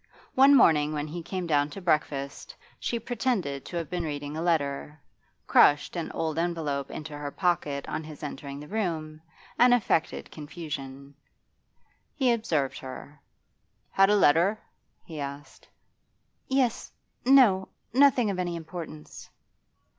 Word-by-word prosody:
One 275 +2 +7
morning 155 - +4
when 150 -1 -2
he 170 +3 -5
came 180 +2 -4
down 145 -3 +2
to 195 - -8
breakfast 150 -5 -2 0.2
she 235 - -2
pretended 225 - -2
to 175 - -5
have 165 -2 -3
been 175 +1 -3
reading 145 -1 -4
a 160 - -3
letter, 150 -3 -1 0.5
crushed 145 +4 +4
an 170 -2 -3
old 160 -1 -2
envelope 155 -5 -2
into 155 -1 -7
her 145 0 -5
pocket 150 -4 -1
on - - -4
his 155 -1 -11
entering 140 -1 -6
the 150 - -10
room, 160 -7 -3 0.4
and 245 0 +7
affected 165 -8 -1
confusion. 145 -3 -7 1.0
He 260 -4 +2
observed 160 - -1
her. 140 +2 -10 0.7
'Had 195 0 +4
a 210 - +5
letter?' 185 +3 +4 0.5
he 160 -3 -8
asked. 140 +1 -8 0.8
'Yes 265 -3 0 0.3
no. 240 -8 +5 0.2
Nothing 255 -5 +4
of 185 - -4
any 175 -1 -2
importance. 160 -2 -9
160 Hz, 135 wpm, -27 LUFS, 145-195 Hz, 1.0 s, One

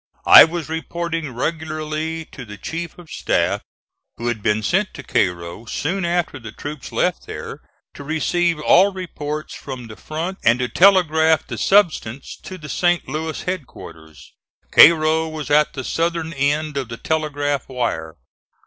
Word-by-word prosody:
I - - +11
was 165 -1 -5
reporting 165 0 -3
regularly 155 +3 -3
to 135 - -9
the 105 -3 -10
chief 165 +5 -6
of 175 -3 -14
staff, - - 0 0.6
who 120 +1 -2
had 115 -3 -3
been 105 +1 +1
sent 190 - 0
to 140 - -8
Cairo, 90 -1 -1
soon 175 +10 -2
after 175 -3 -1
the 110 -3 -9
troops 145 +4 -8
left - - -1
there, - - -7 0.3
to 140 - -10
receive 165 +2 0
all 190 +6 +5
reports 155 -5 -6
from 130 -3 -8
the 110 -1 -10
front 165 - -5
and 115 +1 +4
to 125 0 -1
telegraph 160 -3 +4
the - - -6
substance 160 - +1
to 185 - -8
the 150 -4 -10
St. 175 +3 +1
Louis 160 +1 -4
headquarters. 80 - -8 0.4
Cairo 160 0 +6
was 155 -2 -6
at 150 +1 +4
the 130 - -5
southern 165 +2 -2
end 145 +1 0
of 130 -3 -3
the 115 - -6
telegraph 145 -3 -2
wire. 100 -11 -3
155 Hz, 155 wpm, -20 LUFS, 130-170 Hz, 0.6 s, I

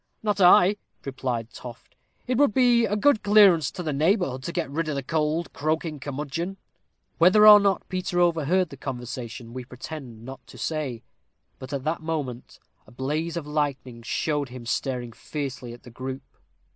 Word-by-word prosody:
"Not 210 -2 0
I," 180 +2 +6 0.3
replied 125 -4 -4
Toft; 120 -2 -11 0.3
"it 250 - -1
would 285 -8 +3
be 245 -2 +4
a 210 - -1
good 220 +1 +3
clearance 195 -8 +5
to 180 - -7
the 155 -3 -2
neighborhood 155 - +1
to - - -3
get 170 -3 -2
rid 155 +1 -2
o' 140 -2 -1
th' 135 +3 -8
old 160 +1 0
croaking 155 0 -2
curmudgeon." 150 +7 -4 0.6
Whether 190 +5 +7
or 210 -1 +11
not 200 -1 0
Peter 185 -1 -2
overheard 175 +1 +2
the 140 - -11
conversation, 120 -2 -6
we 130 0 -6
pretend 125 -2 -9
not 130 -1 -10
to - - -13
say, 145 -8 -3 0.6
but 130 - -9
at 140 -2 -3
that 155 +3 -2
moment 145 -7 -5 0.3
a - - -16
blaze 150 +7 -3
of 165 - -4
lightning 140 -5 -3
showed 145 +3 -2
him 125 -1 -9
staring 125 -1 -2
fiercely 130 0 -6
at 120 - -12
the 125 - -13
group. 130 +2 -6
150 Hz, 170 wpm, -25 LUFS, 130-175 Hz, 0.6 s, or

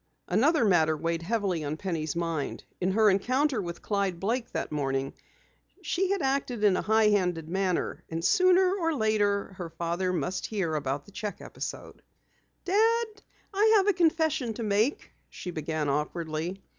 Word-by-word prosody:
Another 265 - +3
matter 160 -5 +3
weighed 165 +1 -2
heavily 190 -3 -1
on 150 +1 -3
Penny's 160 -5 -3
mind. 165 -4 -3 0.2
In 185 +1 0
her 215 +1 +4
encounter 255 +6 +2
with 170 -2 -7
Clyde 200 -4 -1
Blake 230 +5 -1
that - - -3
morning, 135 -2 -1 0.7
she 370 +2 0
had 395 -5 0
acted 265 -4 -1
in 200 -3 +5
a - - 0
high 220 0 +3
handed 180 -6 +1
manner, 185 0 -1
and 165 +1 -3
sooner 370 - +4
or 330 -4 0
later 205 -4 +1
her 175 -2 -4
father 170 +3 -2
must 185 +1 -2
hear 190 -7 -2
about 140 -1 -2
the - - -16
cheque 210 +1 -5
episode. - - -7 0.6
"Dad, 450 +5 +3 0.5
I 430 +3 +4
have 395 0 +2
a 410 - +5
confession 315 - +1
to 235 - -4
make," 215 +6 0 0.2
she 180 - -7
began 155 -1 -2
awkwardly. 160 +5 -2
195 Hz, 160 wpm, -28 LUFS, 165-255 Hz, 0.7 s, in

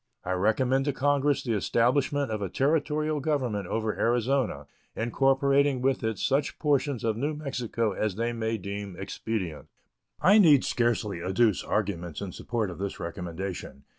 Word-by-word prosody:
I 95 - -2
recommend 125 +8 +2
to 145 - 0
Congress 145 +1 +1
the 120 - -1
establishment 130 +6 +1
of 110 -1 -2
a 100 - -2
Territorial 150 - 0
government 130 - -1
over 110 +1 -1
Arizona, 120 - +1 0.3
incorporating 135 +3 +2
with 130 0 0
it 110 -2 -1
such 140 +8 0
portions 145 -4 0
of 110 -2 +1
New 145 +5 -1
Mexico 125 -6 -2
as 105 0 -2
they 115 +2 -1
may 115 -1 -1
deem 100 -1 -6
expedient. 95 -4 -4 0.5
I 200 +4 +6
need 150 -9 +6
scarcely 115 -6 0
adduce 95 +3 +2
arguments 85 -5 -2
in 100 -3 -5
support 110 0 -3
of 90 - -10
this 100 0 -4
recommendation. 85 -3 -6
115 Hz, 150 wpm, -27 LUFS, 100-140 Hz, 0.5 s, I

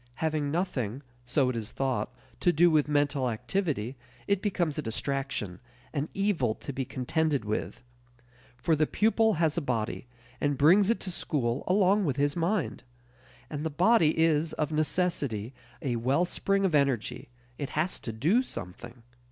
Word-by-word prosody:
Having 155 -1 -1
nothing, 140 - -2 0.2
so 130 +2 +1
it 125 - -2
is 110 -1 -4
thought, 130 -2 -1 0.3
to 175 - +4
do 175 +2 +5
with 150 -2 +3
mental 145 -3 +1
activity, 125 - -2 0.3
it 200 -1 +1
becomes 175 -7 0
a - - 0
distraction, 130 -6 -3 0.3
an 150 +1 -2
evil 180 - +1
to 140 - -7
be 135 - -2
contended 140 +1 -1
with. 105 +3 -3 0.7
For 160 +6 +2
the 155 0 +2
pupil 220 0 +3
has 160 0 +1
a - - -6
body, 120 -3 -2 0.3
and 145 -1 +1
brings 185 +9 +5
it 230 - +2
to 185 - -2
school 130 -7 -1
along 195 +1 +3
with 140 -5 0
his 145 +1 +1
mind. 170 - -1 0.7
And 150 -1 -5
the 160 - -1
body 170 0 +4
is, 160 -1 +2
of 155 0 -2
necessity, 150 - -1 0.3
a 125 -4 0
wellspring 175 +10 +1
of 180 - +1
energy; 135 -7 0 0.3
it 140 - -3
has 170 +4 0
to 115 - -5
do 160 - +2
something. 120 - -8
150 Hz, 160 wpm, -29 LUFS, 125-175 Hz, 0.7 s, do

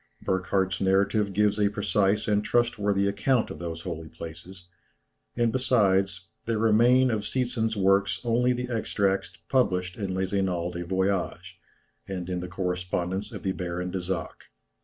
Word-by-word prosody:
Burckhardt's 95 -1 0
narrative 100 +2 +2
gives 105 +1 +2
a 105 -1 +3
precise 105 0 +1
and 105 -1 +2
trustworthy 105 -5 +1
account 110 +5 +1
of - - -8
those 85 -1 -5
holy 80 -2 -6
places, 90 +2 -10 0.7
and 120 -1 +2
besides, 95 -8 +1 0.2
there 115 -1 +1
remain 120 +4 +4
of 110 -2 0
Seetzen's 115 -2 -1
works 95 0 +3
only 120 +1 +2
the 125 0 -2
extracts 100 -4 -1
published 90 -8 +1
in 100 -4 -3
"Les 95 +1 -2
Annales 90 -3 0
des 85 0 -4
Voyages," 95 0 -1 0.5
and 95 -2 -4
in 90 - -1
the 90 - -5
Correspondence 90 +2 -2
of 100 - -8
the 95 - 0
Baron 90 0 -4
de 95 - -2
Zach. 90 -1 -4
95 Hz, 150 wpm, -27 LUFS, 90-110 Hz, 0.7 s, remain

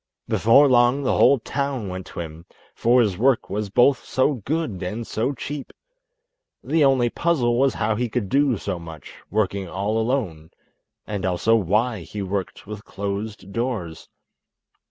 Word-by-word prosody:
Before 135 +6 +5
long 125 +2 +3
the 130 - +1
whole 140 - +5
town 135 -2 -3
went 95 0 -6
to - - -6
him, 80 +1 -9 0.3
for 120 +2 +3
his 100 -4 -2
work 130 -2 +2
was 105 0 -2
both 125 +6 +3
so 130 +3 +1
good 135 - -3
and 105 +6 -4
so 115 +6 -1
cheap. 145 +1 -6 0.9
The 160 -1 +2
only 130 -4 +3
puzzle 125 -8 +1
was 135 -3 +2
how 110 - 0
he 120 +2 -2
could 110 -2 -2
do 135 +1 +2
so 90 - -4
much, 80 -2 -10 0.2
working 100 -3 -1
all 100 +5 -1
alone, 110 - -2 0.6
and 105 -3 -4
also 95 +5 +2
why 110 +3 +1
he 100 +4 -6
worked 95 0 -4
with 105 0 -8
closed 100 0 -5
doors. 110 -9 -4
110 Hz, 155 wpm, -23 LUFS, 95-130 Hz, 0.9 s, Before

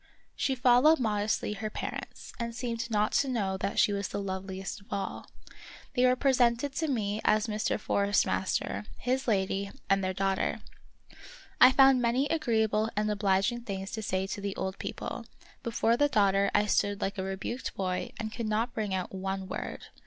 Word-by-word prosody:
She 265 - 0
followed 255 +5 +5
modestly 210 -2 0
her 215 +1 -4
parents, - - -6
and 235 -1 -3
seemed 230 -1 -3
not 210 -1 +1
to 280 - +2
know 205 -7 -1
that 195 - -3
she 205 - +4
was 200 -1 -2
the - - -4
loveliest 190 0 -5
of 200 - -22
all. 195 -1 -4 0.7
They 250 0 +4
were 250 - +4
presented 255 0 +2
to 320 - 0
me 215 -6 -1
as 215 0 +3
Mr. 215 -1 -1
Forest 200 -1 +2
master, 190 +2 -1
his 255 +2 -1
lady, 195 -2 0 0.2
and 195 0 +3
their 185 - 0
daughter. 195 0 0 1.0
I 255 - +9
found 270 -1 +6
many 245 +3 +2
agreeable 220 -8 +1
and 210 +1 +1
obliging 200 +3 +1
things 195 -3 -5
to 220 - -4
say 190 -2 -1
to 200 +1 -5
the 200 -1 -3
old 190 0 -4
people; - - -5 0.3
before 230 0 +1
the 290 +4 +3
daughter 200 -3 +3
I 210 - +3
stood 205 0 +1
like 195 -1 -2
a - - -1
rebuked 195 +6 -4
boy 185 -1 -2
and 220 -1 -4
could 230 -3 -3
not 225 +3 0
bring 210 -3 -2
out 185 0 -4
one 190 0 -3
word. - - -5
210 Hz, 180 wpm, -29 LUFS, 195-240 Hz, 1.0 s, I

